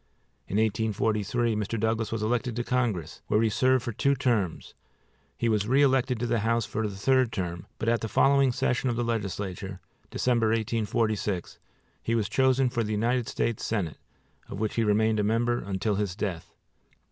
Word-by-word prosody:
In 100 - -2
1843 110 +1 0
Mr. 105 +2 -2
Douglas 110 0 0
was 115 -1 -2
elected 120 +1 -1
to 120 - -1
Congress, 120 - -1
where 105 - +2
he 115 - +3
served 130 +2 +2
for 120 - -3
two 140 +5 +1
terms; 115 - -1 0.6
he 120 - 0
was 105 -2 +1
re 135 +4 +4
elected 130 -3 +2
to 120 - -1
the 120 -1 +1
House 115 +1 +1
for 110 0 -2
the 100 - -6
third 130 +4 +2
term, 85 -4 -4
but - - -4
at 115 0 +2
the 110 - -2
following 135 +3 +4
session 125 +2 0
of 120 - -1
the 120 - -1
legislature, 100 -4 -3 0.3
December, 120 -3 +1
1846, 110 -3 -1 0.4
he 115 - -1
was 110 -3 0
chosen 130 +1 +3
for 120 -1 -1
the 110 0 -2
United 120 +3 0
States 115 -2 -1
Senate, 95 -9 -2 0.5
of - - -6
which 110 0 -1
he 115 - +1
remained 110 +1 +2
a - - +2
member 120 +3 +1
until 100 +2 -2
his 100 -2 -2
death. 95 -6 -4
110 Hz, 180 wpm, -27 LUFS, 105-120 Hz, 0.6 s, re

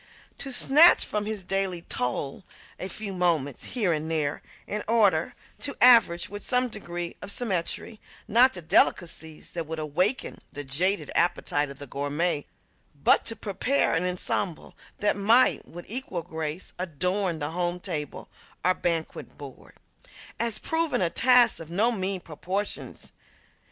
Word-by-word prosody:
To 270 - -3
snatch 295 +7 +7
from 210 0 -3
his 215 -3 -2
daily 190 -2 0
toil 135 +7 -3 0.4
a 185 - -3
few 200 +1 -6
moments, 165 -7 0
here 210 -9 0
and 155 +1 -3
there, 155 -3 -1 0.2
in 210 0 -4
order 205 -8 +2 0.2
to 285 - -1
arrange 225 -9 +6
with 205 +1 -8
some 250 0 +1
degree 175 -5 -6
of - - -6
symmetry, 210 0 -2 0.3
not 240 +4 +5
the 175 - -7
delicacies 160 -1 +1
that 165 -3 -4
would 160 0 -5
awaken 180 - 0
the 145 - -5
jaded 180 +9 -1
appetite 150 -4 +1
of 140 - -10
the 145 - -7
gourmet, 145 +4 -2 0.5
but 140 - +3
to 225 - 0
prepare 220 +6 0
an 165 - +1
ensemble 180 -1 -2 0.2
that 205 - +1
might, 225 +6 +3
with 175 +1 -10
equal 220 -7 -4
grace, 160 0 -5
adorn 180 +1 -1
the 145 0 -4
home 175 +1 -1
table 160 -6 -5 0.4
or 185 - +5
banquet 165 -3 -3
board, 140 -3 -12 0.6
has 230 -2 0
proven 325 - -1
a 170 - +1
task 245 +3 +4
of 165 -1 -9
no 210 +8 +2
mean 190 -3 -3
proportions. 185 +6 -5
180 Hz, 145 wpm, -26 LUFS, 160-215 Hz, 0.6 s, snatch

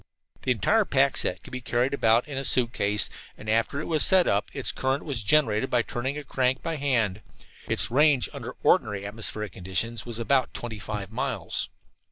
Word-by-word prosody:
The - - -4
entire 210 - +2
pack 140 -6 +2
set 90 -2 0
could - - -12
be 125 - -5
carried 120 +3 0
about 115 -2 +3
in 145 - -6
a 135 - -2
suitcase, 115 -5 +3 0.3
and 105 - -12
after 115 +6 0
it 155 - -4
was 155 -3 +2
set 185 -2 +6
up 100 +3 +1
its 140 - 0
current 135 +1 -2
was 135 -7 -2
generated 130 -2 +2
by 120 -1 +2
turning 130 +5 -4
a 150 - -6
crank 130 -1 0
by 165 -1 -3
hand. 115 -8 0 0.5
Its - - -1
range, 140 -3 +4
under - - -7
ordinary 100 -2 +2
atmospheric 105 -1 -2
conditions, 95 +6 -2
was 120 -2 -4
about 130 +3 +1
twenty 110 -3 -5
five 105 -1 -5
miles. - - -2
120 Hz, 190 wpm, -26 LUFS, 110-140 Hz, 0.5 s, set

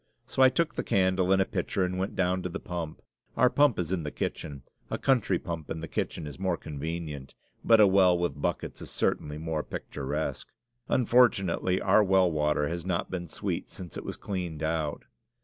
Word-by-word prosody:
So - - -1
I 130 - +9
took 155 +5 0
the - - -3
candle 95 -1 +2
and 95 - +5
a 95 - +3
pitcher 95 0 -1
and 90 0 -3
went 95 - -2
down 90 0 +1
to 90 - -3
the - - -5
pump. 85 -3 -6 0.3
Our 125 +1 +5
pump 145 -5 +4
is 90 -1 -2
in 95 -3 0
the 75 - -3
kitchen. 70 -2 -4 0.3
A - - -2
country 115 -9 +2
pump 85 -3 -6
in 80 - -3
the 80 - -5
kitchen 80 - -3
is 75 +2 -8
more 95 -3 0
convenient; 75 -2 -6 0.3
but 115 -1 +6
a 105 - +9
well 95 -2 +5
with 85 -5 -2
buckets - - -2
is - - -7
certainly 75 0 -1
more 80 0 -2
picturesque. 75 +1 -4 0.4
Unfortunately, 105 -7 +3
our 100 +2 +4
well 95 -2 +4
water 75 -1 +1
has 85 +1 -4
not 90 -1 -2
been 90 -2 -4
sweet - - -4
since 90 -2 -9
it - - -5
was - - -6
cleaned 90 -6 -4
out. 80 -2 -1
90 Hz, 200 wpm, -28 LUFS, 80-95 Hz, 0.4 s, I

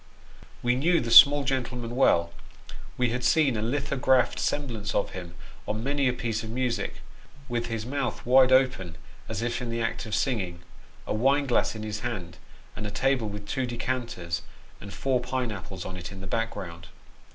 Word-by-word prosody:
We 120 0 +3
knew 165 +7 +3
the 115 -1 -3
small 145 +3 +9
gentleman 125 -3 -2
well; 85 -10 +3 0.6
we 125 -1 +2
had 125 +1 -3
seen 150 -6 +3
a 105 - -2
lithographed 130 +1 +1
semblance 115 -8 -2
of - - 0
him, 90 -2 -8 0.3
on 110 +1 -2
many 140 0 +1
a 125 - +2
piece 115 -3 -2
of 110 - -7
music, 120 -3 -2 0.4
with 120 -2 -2
his 115 -2 -3
mouth 140 +2 -3
wide 130 +1 +6
open 130 -11 +2 0.3
as 110 0 -3
if 120 +1 -2
in 120 - -4
the 115 0 -2
act 115 - -3
of 105 - -1
singing; 95 -9 -1 0.4
a - - -2
wine 135 +6 +2
glass 125 -3 +1
in 110 - -6
his 105 0 -4
hand; 95 -9 -5 0.4
and 105 - -4
a - - -3
table 125 +1 0
with 105 0 -8
two 130 +1 -1
decanters 120 -8 -3 0.4
and 100 - -9
four 130 +2 0
pine 125 -1 -2
apples 95 -2 -7
on 95 - -6
it 90 +1 -7
in 95 - -9
the 95 - -8
background. 90 -5 -4
120 Hz, 185 wpm, -27 LUFS, 105-130 Hz, 0.6 s, small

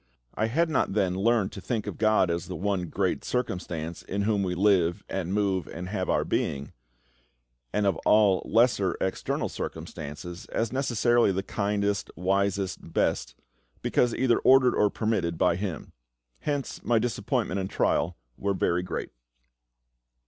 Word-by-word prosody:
I 110 - 0
had 165 +9 +2
not 155 -10 0
then 95 -3 +1
learned 105 +1 +2
to 100 - -8
think 110 +2 -2
of - - -6
GOD 110 -5 +3
as 85 +1 -3
the 90 - -5
One 95 +1 -1
Great 95 +1 -1
Circumstance 85 -9 -3
"in 100 +1 -3
Whom 105 -1 +1
we 90 -2 -1
live, 90 -3 +3
and 95 -2 -3
move, 100 -4 0
and 90 +2 -6
have 95 -2 -2
our - - +2
being"; 70 0 -2 1.0
and 105 - +1
of 100 - +2
all 105 -3 +4
lesser, 110 -5 +2
external 95 - -1
circumstances, 85 +5 -7
as 115 +2 -2
necessarily 120 -4 +3
the 95 +1 -2
kindest, 100 0 -1
wisest, 95 +1 0
best, - - 0 0.5
because 120 -2 +2
either 125 -3 +3
ordered 130 -1 +5
or 105 - +3
permitted 100 -7 -1
by 90 -1 +3
Him. 95 -5 -5 0.5
Hence 145 -3 -3
my 120 - +2
disappointment 110 -2 -1
and 95 0 -3
trial - - +1 0.2
were 100 0 0
very 90 -1 +1
great. 90 - -4
100 Hz, 150 wpm, -27 LUFS, 90-110 Hz, 1.0 s, ordered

